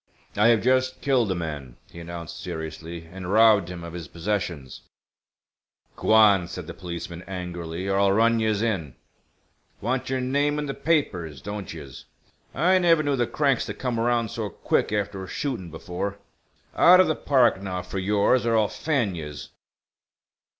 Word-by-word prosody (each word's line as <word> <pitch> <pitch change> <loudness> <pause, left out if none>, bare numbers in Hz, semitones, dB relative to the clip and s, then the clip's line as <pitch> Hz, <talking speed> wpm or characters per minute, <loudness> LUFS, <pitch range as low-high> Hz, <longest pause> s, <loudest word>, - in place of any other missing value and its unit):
"I 105 +2 +4
have 115 -2 +4
just 130 +1 +2
killed 125 -7 +2
a - - 0
man," 75 -7 -6
he 85 - -10
announced, 85 0 -8
seriously, 80 0 -6
"and 90 +2 -7
robbed 105 -4 +5
him 90 -2 -7
of 85 -1 -8
his 85 -3 -7
possessions." 85 -7 -4 1.1
"G'wan," 105 -5 +5
said 90 0 -7
the 85 - -7
policeman, 85 -1 -7
angrily, 90 -1 -5
"or 95 0 +1
I'll 100 -1 +4
run 115 +3 +3
yez 110 -1 +1
in! 85 - -2 0.8
Want 130 +1 -2
yer 130 0 0
name 140 +3 0
in 150 - -2
the 140 - -3
papers, 90 - -1
don't 105 +3 -6
yez? 70 -6 -10 0.5
I 185 +5 +4
never 165 -3 +4
knew 145 -1 +1
the 120 -3 0
cranks 140 -4 +1
to - - -5
come 125 -3 -2
around 120 -1 +1
so 115 -3 -3
quick - - 0
after 100 -2 -2
a - - -8
shootin' 120 -10 -4
before. 90 +5 -5 0.6
Out 180 +1 +7
of 185 - +7
th' 155 - -2
park, 125 -8 +3
now, 90 -2 -4
for 95 +2 -5
yours, 105 +6 +2
or 115 -1 +2
I'll 105 -2 +2
fan 130 -11 -1
yez." 75 -4 -7
100 Hz, 170 wpm, -25 LUFS, 85-120 Hz, 1.1 s, Out